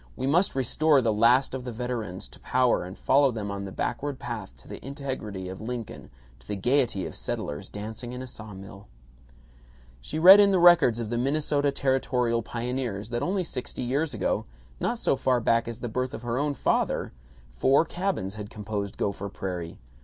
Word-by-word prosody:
We 130 - -3
must 170 +7 +2
restore 140 +3 +3
the 115 -4 +1
last 120 +6 +4
of 130 -1 -4
the 125 - -5
veterans 115 -6 -4
to - - -14
power 125 -6 +2
and 90 +1 -9
follow 140 0 +4
them 105 -4 -4
on 100 0 -4
the 95 - -7
backward 135 +7 -3
path - - -6
to - - -19
the - - -9
integrity 130 -9 -5
of 95 +2 -7
Lincoln, 115 0 -6 0.3
to 60 - -21
the 105 - -2
gaiety 120 -1 +1
of - - -6
settlers 75 - -4
dancing 110 +4 -7
in 125 - -6
a - - -6
saw 110 -5 -9
mill. 95 +1 -11 1.1
She - - -5
read 185 +5 +10
in 200 -1 +6
the 195 - +3
records 175 -10 +6
of 115 -1 -4
the 120 - 0
Minnesota 145 +2 +1
Territorial 125 -3 +1
Pioneers 120 -3 -4
that 120 0 -2
only 185 +1 0
sixty 130 -5 -5
years 140 +5 0
ago, 105 - -1 0.3
not 240 - -1
so 180 - +1
far 130 -1 +1
back 115 0 +2
as 115 -1 -6
the 120 - -2
birth 125 +4 -2
of - - -9
her 120 +1 -1
own 145 0 0
father, - - 0 0.4
four 135 - +3
cabins 175 - -2
had 105 -1 -7
composed 105 -1 -5
Gopher 100 0 -2
Prairie. 90 -4 -5
120 Hz, 190 wpm, -27 LUFS, 105-135 Hz, 1.1 s, read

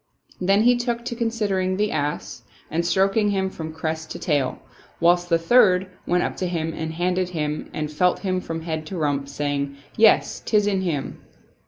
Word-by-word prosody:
Then 195 +3 +3
he 245 +1 +5
took 240 -1 -2
to 245 -1 -3
considering 205 -5 0
the 210 +1 +1
ass 145 -1 -3 0.3
and 165 +2 0
stroking 195 +4 +2
him 190 -1 0
from 160 -3 -6
crest 160 0 -4
to - - -5
tail; 145 -5 0 0.4
whilst 175 +1 +3
the 165 - +4
third 185 0 +4 0.2
went 180 0 +2
up - - -2
to 185 - -1
him 165 -2 -2
and 160 0 -4
handled 180 +1 0
him 150 -3 -3
and 155 -1 -4
felt 180 +4 +2
him 185 -2 -1
from 165 -1 -5
head 160 -2 -4
to 190 - -5
rump, 145 -3 -1
saying, 140 0 -2 0.2
"Yes, 220 0 +4
'tis 210 -2 +2
in 195 -2 +1
him." 160 -7 -3
175 Hz, 185 wpm, -23 LUFS, 155-195 Hz, 0.4 s, he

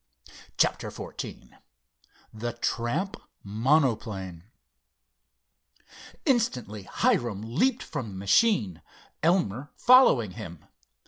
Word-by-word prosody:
CHAPTER - - +1
XIV - - -8 0.8
THE 115 +2 -4
TRAMP 140 - -2 0.3
MONOPLANE 110 - 0 1.8
Instantly 125 - 0
Hiram 120 - 0
leaped 200 - 0
from 145 -7 -5
the 95 - -9
machine, 100 - +2 0.4
Elmer 150 - +1
following 245 - +5
him. 85 -2 -9
120 Hz, 75 wpm, -27 LUFS, -, 1.8 s, following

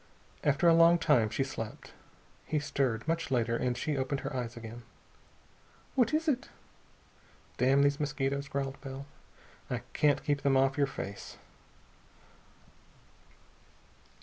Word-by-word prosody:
After 145 +3 +3
a 165 - +7
long 165 +1 +6
time 115 -9 +3
she 135 - 0
slept. 115 -5 -7 0.5
He 155 - 0
stirred, 135 -4 -1
much 165 +1 -1
later, 120 -3 +1
and 125 0 -1
she 150 - -1
opened 135 +1 -1
her 135 - -5
eyes 120 -2 -4
again. 115 +1 -8 1.1
"What 250 -4 +3
is 315 +1 0
it?" 275 -3 0 1.1
"Damn 135 +2 +4
these 140 0 +2
mosquitos," 140 -1 -1
growled 135 -1 -3
Bell. 135 0 -7 0.6
"I - - -3
can't 145 -2 +2
keep 145 -1 0
them 135 -1 +3
off 135 0 +3
your 140 -1 +2
face!" 100 -7 -7
140 Hz, 130 wpm, -31 LUFS, 130-150 Hz, 1.1 s, a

